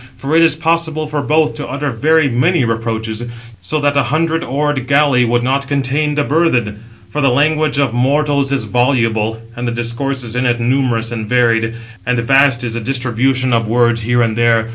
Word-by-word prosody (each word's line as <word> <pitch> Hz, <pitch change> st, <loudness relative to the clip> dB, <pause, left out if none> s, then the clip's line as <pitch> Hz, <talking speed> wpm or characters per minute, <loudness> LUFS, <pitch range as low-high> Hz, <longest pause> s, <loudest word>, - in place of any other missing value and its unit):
For 140 Hz, +3 st, -2 dB
it 165 Hz, -, +5 dB
is 165 Hz, -2 st, +4 dB
possible 160 Hz, -1 st, -1 dB
for 150 Hz, -1 st, -3 dB
both 155 Hz, +1 st, +1 dB
to 150 Hz, -, -5 dB
utter 140 Hz, +2 st, -3 dB
very 155 Hz, +6 st, +2 dB
many 135 Hz, +4 st, +1 dB
reproaches, 115 Hz, 0 st, -3 dB, 0.4 s
so 95 Hz, +12 st, -3 dB
that 145 Hz, 0 st, +1 dB
a 140 Hz, -, +4 dB
hundred 165 Hz, +2 st, 0 dB
oared 140 Hz, -1 st, -2 dB
galley 140 Hz, -2 st, +3 dB
655 -, -, -2 dB
would 120 Hz, 0 st, +1 dB
not 135 Hz, +2 st, -1 dB
contain 145 Hz, +2 st, -1 dB
the 145 Hz, -, +1 dB
burthen; 125 Hz, -10 st, 0 dB, 0.3 s
for 150 Hz, -, -2 dB
the 135 Hz, -, +3 dB
language 150 Hz, +3 st, +1 dB
of 140 Hz, -5 st, +1 dB
mortals 140 Hz, +2 st, +1 dB
is 140 Hz, -, 0 dB
voluble, 115 Hz, -4 st, 0 dB
656 115 Hz, +1 st, -16 dB
and 120 Hz, -, -3 dB
the -, -, -1 dB
discourses 120 Hz, 0 st, -4 dB
in 125 Hz, +1 st, 0 dB
it 120 Hz, -1 st, 0 dB
numerous 120 Hz, -2 st, 0 dB
and 110 Hz, -2 st, -5 dB
varied: 115 Hz, -2 st, +1 dB, 0.3 s
and 125 Hz, +1 st, -1 dB
vast 135 Hz, +1 st, +3 dB
is 120 Hz, -2 st, -3 dB
the 115 Hz, -, -3 dB
distribution 130 Hz, +1 st, 0 dB
657 -, -, +2 dB
of 115 Hz, -, -6 dB
words 120 Hz, 0 st, +2 dB
here 120 Hz, +2 st, +1 dB
and 110 Hz, -1 st, -1 dB
there. 115 Hz, -1 st, +2 dB
130 Hz, 205 wpm, -15 LUFS, 115-145 Hz, 0.4 s, it